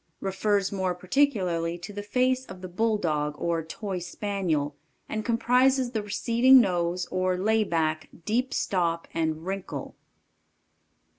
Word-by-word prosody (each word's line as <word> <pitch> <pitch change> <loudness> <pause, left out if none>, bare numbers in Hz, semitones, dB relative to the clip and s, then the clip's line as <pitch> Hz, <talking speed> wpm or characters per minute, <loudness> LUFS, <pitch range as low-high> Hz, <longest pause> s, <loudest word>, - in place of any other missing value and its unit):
Refers 195 0 0
more 190 -2 -1
particularly 180 -6 +1
to 180 +4 -9
the 205 - -4
face 255 +5 +1
of 185 -1 -10
the 185 - -6
Bulldog 175 -7 0
or 165 0 -1
Toy 190 +3 -5
Spaniel, 175 -5 -2 0.3
and 215 0 -3
comprises 250 +3 +3
the 220 -3 -1
receding 235 +5 +5
nose, 180 -4 +1
or 185 0 +1
lay 220 +3 +2
back, 160 -4 -1 0.2
deep 250 +5 0
stop, 170 -3 0
and 160 0 -1
wrinkle. 195 0 -5
190 Hz, 130 wpm, -27 LUFS, 170-220 Hz, 0.3 s, receding